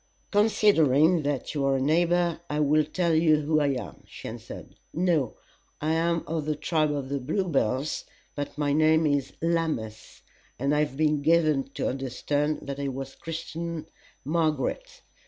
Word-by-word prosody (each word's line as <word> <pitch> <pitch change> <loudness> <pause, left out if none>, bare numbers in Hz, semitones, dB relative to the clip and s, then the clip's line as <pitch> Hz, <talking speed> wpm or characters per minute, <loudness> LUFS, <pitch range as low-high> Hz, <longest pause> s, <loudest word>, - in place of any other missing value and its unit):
"Considering 175 -7 +4
that 145 -2 -2
you 145 -2 -1
are 135 0 +2
a - - +1
neighbor, 170 +3 +2
I 150 - -1
will 150 +1 +3
tell 170 +2 0
you 155 -1 +4
who 155 +1 +2
I 145 - +2
am," 135 -3 -4
she - - -9
answered. - - -10 0.2
"No; 165 -7 0 0.4
I 155 +2 0
am 170 0 +1
of 160 -2 -3
the 155 0 -1
tribe 155 0 0
of 140 -2 -3 0.2
Bluebells, 150 - 0 0.3
but 145 0 -5
my 145 -1 +1
name 160 +1 +4
is 145 -3 0
Lammas, 160 -10 -2 0.3
and 140 +3 0
I 150 - +2
have 150 -3 -1
been 150 -1 +2
given 155 -3 +3
to - - -1
understand 145 +3 -1
that 140 0 -5
I 140 - -2
was 135 0 -5
christened 165 0 -6 0.3
Margaret. 160 - -1
155 Hz, 155 wpm, -27 LUFS, 140-165 Hz, 0.4 s, Considering